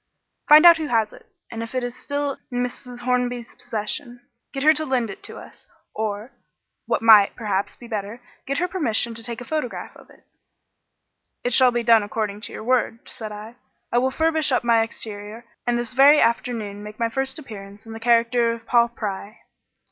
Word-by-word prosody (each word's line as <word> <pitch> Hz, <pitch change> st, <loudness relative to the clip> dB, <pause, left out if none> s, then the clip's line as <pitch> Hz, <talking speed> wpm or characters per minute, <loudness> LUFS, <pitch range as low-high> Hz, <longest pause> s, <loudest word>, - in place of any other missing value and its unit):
"Find 305 Hz, +3 st, +9 dB
out 340 Hz, -1 st, +9 dB
who 315 Hz, -1 st, -3 dB
has 225 Hz, -4 st, +1 dB
it, -, -, -16 dB, 0.2 s
and, 225 Hz, -1 st, -5 dB
if 230 Hz, +2 st, -7 dB
it 255 Hz, -, 0 dB
is 245 Hz, 0 st, -4 dB
still 285 Hz, -1 st, -3 dB
in 245 Hz, 0 st, -1 dB
Mrs. 250 Hz, 0 st, -6 dB
Hornby's 245 Hz, -1 st, -1 dB
possession, 235 Hz, +3 st, -5 dB, 0.3 s
get 270 Hz, -1 st, -4 dB
her 310 Hz, +1 st, +7 dB
to 315 Hz, 0 st, -2 dB
lend 250 Hz, -7 st, -1 dB
it -, -, -11 dB
to -, -, -8 dB
us -, -, -13 dB, 0.3 s
or 215 Hz, +2 st, -4 dB, 0.6 s
what -, -, 0 dB
might, 215 Hz, -3 st, +7 dB
perhaps, 200 Hz, -4 st, -2 dB
be 240 Hz, -, -13 dB
better 210 Hz, 0 st, -5 dB, 0.3 s
get 275 Hz, +1 st, -1 dB
her 360 Hz, -, +1 dB
permission 240 Hz, -, 0 dB
to 230 Hz, -, -5 dB
take 235 Hz, +1 st, -5 dB
a -, -, -8 dB
photograph 305 Hz, -5 st, -4 dB
of -, -, -17 dB
it." -, -, -21 dB, 1.2 s
"It 245 Hz, -, 0 dB
shall 255 Hz, +1 st, +6 dB
be 240 Hz, -1 st, -1 dB
done 230 Hz, -1 st, +6 dB
according 205 Hz, 0 st, -3 dB
to -, -, -5 dB
your -, -, -8 dB
word," 240 Hz, -1 st, 0 dB
said 220 Hz, -4 st, -7 dB
I. 215 Hz, +3 st, -9 dB, 0.3 s
"I 240 Hz, -, +3 dB
will 260 Hz, +2 st, +1 dB
furbish 315 Hz, +1 st, +1 dB
up 250 Hz, -, +2 dB
my 230 Hz, -1 st, +4 dB
exterior, 220 Hz, 0 st, -6 dB, 0.2 s
and 240 Hz, 0 st, +2 dB
this 240 Hz, -1 st, -4 dB
very 280 Hz, +3 st, +7 dB
afternoon 230 Hz, -3 st, 0 dB
make 210 Hz, 0 st, -9 dB
my 230 Hz, -1 st, 0 dB
first 265 Hz, +2 st, -3 dB
appearance 205 Hz, -7 st, -10 dB
in 225 Hz, -, -9 dB
the 225 Hz, -, -7 dB
character 235 Hz, 0 st, +3 dB
of 230 Hz, 0 st, -10 dB
Paul 235 Hz, 0 st, +4 dB
Pry." 210 Hz, -1 st, -6 dB
235 Hz, 200 wpm, -23 LUFS, 220-255 Hz, 1.2 s, Find